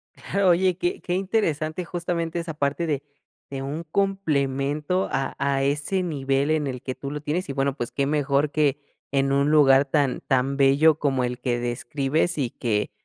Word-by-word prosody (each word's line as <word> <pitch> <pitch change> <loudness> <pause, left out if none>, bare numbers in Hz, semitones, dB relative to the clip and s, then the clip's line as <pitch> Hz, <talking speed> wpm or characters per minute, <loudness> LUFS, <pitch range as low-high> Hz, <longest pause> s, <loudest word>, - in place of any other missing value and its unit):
Claro, 195 -1 0
oye, 180 0 +3
qué 360 - -2
qué 175 - -2
interesante 180 -4 -1
justamente 170 -1 -2
esa 165 -1 -5
parte 145 +3 -1
de 145 -4 -1 0.5
de 135 -1 -5
un 150 +5 -4
complemento 155 -3 0
a 135 0 -1
a 140 -1 +1
ese 150 +7 0
nivel 140 -3 0
en 155 -2 +1
el 125 -2 -5
que 130 - -3
tú 140 - -6
lo 150 +1 -5
tienes 150 +4 -2
y - - -2
bueno 135 0 0
pues 120 -4 -4
que 140 - 0
mejor 145 0 +1
que 145 -2 +1 0.3
en 135 0 +1
un 140 +1 +2
lugar 140 -2 +6
tan 140 -2 0
tan 135 +1 +1
bello 140 +3 +4
como 135 -3 +1
el 125 0 -3
que 125 -1 -1
describes 135 +7 -1
y 130 -5 -1
que 105 -3 -1
145 Hz, 185 wpm, -24 LUFS, 135-165 Hz, 0.5 s, lugar